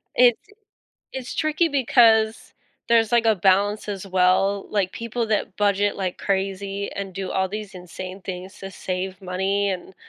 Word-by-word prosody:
It's 245 -2 +5 0.7
it's 260 -2 -6
tricky 310 +2 +1
because 230 -5 +3 0.4
there's, 230 -1 +3
like, 235 -1 +4
a 220 - +5
balance 200 +2 +2
as 200 -1 -4
well, 190 +2 +2
like 195 -3 0
people 230 0 -3
that 210 -2 -1
budget 205 0 +1
like 185 -2 -3
crazy 195 0 -2
and 195 -2 -5
do 190 0 -4
all 190 0 0
these 205 0 -6
insane 185 +1 -8
things 185 +1 -7
to 195 - -7
save 185 0 -4
money 195 +2 0
and, 185 0 -6
200 Hz, 155 wpm, -23 LUFS, 190-220 Hz, 0.7 s, It's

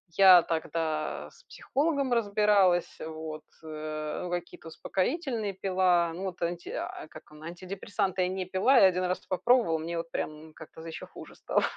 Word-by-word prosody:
Я 185 -3 +9
тогда 160 -1 -2
с - - -21
психологом 280 - -1
разбиралась, 205 -5 +3
вот, 155 -1 -7 0.2
э, 155 -1 -5
ну, 180 - -4
какие-то 175 -2 -5
успокоительные 220 - -2
пила. 185 -3 +2
Ну 190 - -5
вот 185 -2 -6
анти 170 0 -3
а, - - -5
как - - -14
он, 150 0 -14
антидепрессанты 185 +2 -3
я - - +1
не 185 -1 -3
пила, 195 +9 +3
я 190 - +8
1 185 0 0
раз 180 +1 -1
это - - -26
попробовала, 190 -4 +3
мне 170 +1 -4
вот 165 0 -5
прям 155 +1 -5
как-то 160 0 -12
ещё 165 - -7
хуже - - -12
стало. - - 0
180 Hz, 170 wpm, -29 LUFS, 160-195 Hz, 0.2 s, Я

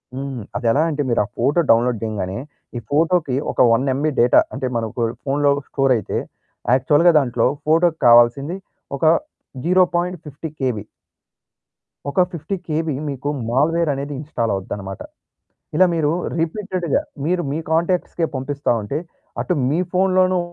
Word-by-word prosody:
హ్మ్. 135 -2 -5 0.2
అది 120 -1 -2
ఎలా 145 - +2
అంటే 150 -2 -2
మీరు 115 - +2
ఆ - - -11
ఫోటో 140 +8 +2
డౌన్లోడ్ 115 0 +2
జేయంగానే 100 -2 -3 0.4
ఈ - - -2
ఫోటోకి 160 -2 +2 0.2
ఒక - - 0
1 120 +4 +1
ఎంబీ 150 +3 0
డేటా 120 - +6
అంటే 130 0 -2
మనకు 115 +1 -3 0.2
ఫోనులో 145 +1 +2 0.2
స్టోర్ 135 -2 +2
అయితే 105 - -3 0.6
యాక్చువల్‌గా 145 +7 +4
దాంట్లో 120 -4 +1 0.2
ఫోటోకి 165 +1 +3
కావాల్సింది 120 +7 +5 0.4
ఒక 150 - -1 0.6
0.50 175 -4 0
కేబీ. 125 -6 -1 1.3
ఒక 140 - -1
50 170 +4 -4
కేబీ 155 -1 -1 0.2
మీకు 140 +1 -4 0.2
మాల్‌వేర్ 155 +6 +2
అనేది 140 +2 -4
ఇన్‌స్టాల్ 125 -6 -2
అవుద్దనమాట. 95 0 -6 0.7
ఇలా 185 - +6
మీరు 155 -3 +1 0.3
రిపీటెడ్‌గా 175 -1 -1 0.2
మీరు 175 +2 +1
మీ 155 - -2
కాంటాక్ట్స్‌కే 170 0 0
పంపిస్తా 140 +1 -2
ఉంటే 140 +9 -3 0.4
అటు 180 - -1 0.2
మీ 155 +5 +1
ఫోనులోనూ 185 0 +3
145 Hz, 135 wpm, -20 LUFS, 125-170 Hz, 1.3 s, డేటా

